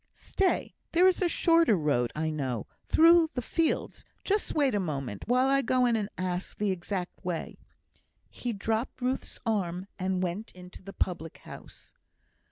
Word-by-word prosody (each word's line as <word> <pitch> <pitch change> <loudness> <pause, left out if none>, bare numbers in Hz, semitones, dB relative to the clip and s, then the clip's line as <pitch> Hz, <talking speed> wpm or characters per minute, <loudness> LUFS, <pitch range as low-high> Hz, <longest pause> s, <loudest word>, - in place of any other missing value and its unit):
Stay, 385 -1 0 0.2
there 350 +2 +5
is 375 0 +4
a 355 - +3
shorter 330 - +4
road, 145 -8 +1
I 155 +1 -1
know, 130 -7 -3 0.2
through 330 0 +6
the 250 - -1
fields; 325 +6 -1 0.2
just 410 +1 0
wait 285 -4 +3
a 205 - +1
moment, 135 - -4
while 250 +2 +3
I 275 0 +3
go 255 0 +2
in 240 -2 +3
and 210 -2 -1
ask 180 0 -3
the 205 -1 +1
exact 185 0 -4
way." 175 -2 -4 0.7
He 245 - -4
dropped 220 +4 -2
Ruth's 255 +1 -2
arm, 185 -5 -1
and 185 0 0
went 185 +5 -3
into 180 0 -12
the 195 +1 -9
public 165 -3 -3
house. - - -12
205 Hz, 165 wpm, -29 LUFS, 175-265 Hz, 0.7 s, through